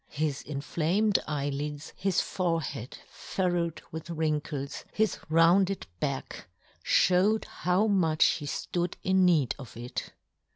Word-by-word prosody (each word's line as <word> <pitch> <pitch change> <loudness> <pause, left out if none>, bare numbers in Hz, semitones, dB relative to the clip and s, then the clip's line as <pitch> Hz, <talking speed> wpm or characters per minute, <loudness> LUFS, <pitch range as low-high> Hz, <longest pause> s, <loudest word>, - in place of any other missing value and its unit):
His 150 -1 -2
inflamed 170 +8 +1
eye 145 -2 -1
lids, 145 +1 -5
his 190 -2 +1
forehead 165 - -2
furrowed 175 -4 -2
with 160 +1 -7
wrinkles, 150 -3 -2
his 220 0 0
rounded 180 +4 +4
back, 140 -9 -4 0.4
fhowed 190 +5 +3
how 180 +5 +1
much 170 -7 +3
he 145 - 0
flood 175 +4 -2
in 190 0 +4
need 160 -8 +3
of 125 -4 -10
it. 120 +1 -5
165 Hz, 120 wpm, -29 LUFS, 145-185 Hz, 0.4 s, rounded